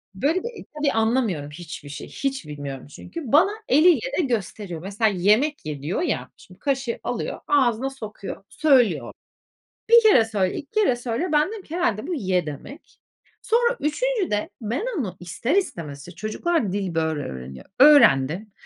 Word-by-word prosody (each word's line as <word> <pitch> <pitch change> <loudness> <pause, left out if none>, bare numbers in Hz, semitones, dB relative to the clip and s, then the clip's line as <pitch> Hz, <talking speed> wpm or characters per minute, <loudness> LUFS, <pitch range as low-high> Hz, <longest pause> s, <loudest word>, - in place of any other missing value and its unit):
Böyle 300 - +1
bir 475 -3 -7
tabii 295 -2 +1
anlamıyorum 220 - 0
hiçbir 155 -3 -9
şey, 140 - -7
hiç 270 - -3
bilmiyorum 140 -2 -7
çünkü. 335 - -9
Bana 360 +8 +5 0.2
eliyle 345 - +4
de 350 - +3
gösteriyor. 205 - -3
Mesela 205 +4 0
yemek 210 - +2
ye 145 -3 -5
diyor 160 - -2
ya. - - -2
Şimdi - - -17
kaşığı 270 -4 -1
alıyor. 245 - -3
Ağzına 260 -3 +2
sokuyor. 215 -7 -8
Söylüyor. 270 -7 +2 0.8
1 470 0 +8
kere 410 - +6
söyle, 205 -4 -1
2 285 - -8
kere 415 - +2
söyle, 240 +8 -2
ben 300 +3 +3
dedim 435 -3 -7
ki 320 - -9
herhâlde 225 - 0
bu 360 - -2
"Ye!" 185 - 0
demek. 200 - -10 0.4
Sonra 475 +2 +2
üçüncüde, 360 - -1
ben 235 - -2
onu 190 -9 -3
ister 230 - -2
istemez, 160 - -2
işte - - -11
çocuklar 215 - -1
dil 195 -3 -2
böyle 160 -2 0
öğreniyor. 65 - -8
Öğrendim 200 - +6
230 Hz, 160 wpm, -23 LUFS, -, 0.8 s, 1